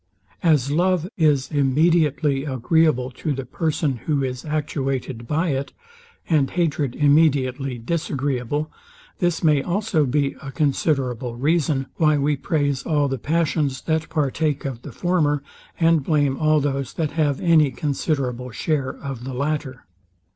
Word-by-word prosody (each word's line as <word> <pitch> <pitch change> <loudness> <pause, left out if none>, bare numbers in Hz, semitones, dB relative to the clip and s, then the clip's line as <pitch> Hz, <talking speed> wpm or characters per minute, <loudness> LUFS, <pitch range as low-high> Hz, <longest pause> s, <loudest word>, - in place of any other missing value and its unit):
As 150 -5 +3
Love 180 +2 +1
is 150 -5 +2
immediately 145 0 +2
agreeable 135 -1 +1
to 150 +4 -3
the 135 -1 -5
person, 150 -1 -1
who 145 -3 +1
is 125 -1 -4
actuated 135 -5 -3
by 160 +5 0
it, 140 -1 -2 0.5
and 150 -5 +2
hatred 150 -7 -1
immediately 140 -3 +2
disagreeable; 145 0 -2 0.5
this 175 -2 0
may 150 -3 +4
also 175 -2 0
be 140 +1 0
a 135 - -7
considerable 135 -5 0
reason, 145 0 +1
why 155 -2 +3
we 145 +1 +1
praise 145 -3 -1
all 145 0 +1
the 135 -1 -3
passions 150 -3 0
that 160 -1 -1
partake 150 -1 -1
of 130 -4 -4
the - - -9
former, 150 -6 0 0.4
and 165 -3 +3
blame 145 -3 +1
all 155 +1 +3
those 135 -2 -2
that 155 -3 -2
have 145 -3 0
any 160 -4 +4
considerable 130 -2 -2
share 135 +2 -1
of 135 -4 -5
the 130 0 -5
latter. 140 -2 -3
145 Hz, 140 wpm, -22 LUFS, 135-155 Hz, 0.5 s, may